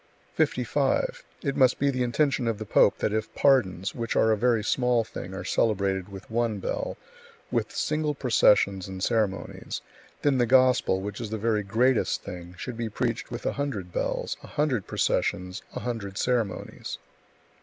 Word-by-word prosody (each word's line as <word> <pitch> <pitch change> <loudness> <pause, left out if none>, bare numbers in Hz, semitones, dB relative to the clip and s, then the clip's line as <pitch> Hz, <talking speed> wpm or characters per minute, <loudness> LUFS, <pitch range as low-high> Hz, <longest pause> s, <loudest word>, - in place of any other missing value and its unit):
55. - - 0 0.2
It 140 -3 -1
must 130 -1 +4
be 140 0 +2
the 130 -1 -2
intention 125 +1 +1
of 115 -2 0
the 110 - -6
pope - - +4
that 105 - -1
if 110 0 -2
pardons, 105 -9 +3
which 115 -1 -3
are 110 - +4
a - - +4
very 115 0 +2
small 125 0 +2
thing, 95 -3 -8
are 100 - -5
celebrated 100 -3 0
with 95 0 -10
one 115 -2 0
bell, 95 - -3 0.5
with - - 0
single 150 -1 -1
processions 105 -7 +3
and 95 -1 -6
ceremonies, 110 -5 -1 0.4
then 140 -3 +3
the 120 - +3
Gospel, 130 -6 +4
which 105 +1 -5
is 110 - -4
the 110 - -3
very 110 0 +1
greatest 115 +5 +1
thing, 90 0 -8
should 125 +3 -6
be 115 -1 -2
preached 115 +2 -2
with 120 0 -6
a - - +1
hundred 110 -11 -3
bells, - - -2
a - - -11
hundred 145 -9 0
processions, 90 +3 0
a - - -3
hundred 110 -5 -4
ceremonies. 120 -6 -2
115 Hz, 170 wpm, -27 LUFS, 100-125 Hz, 0.5 s, must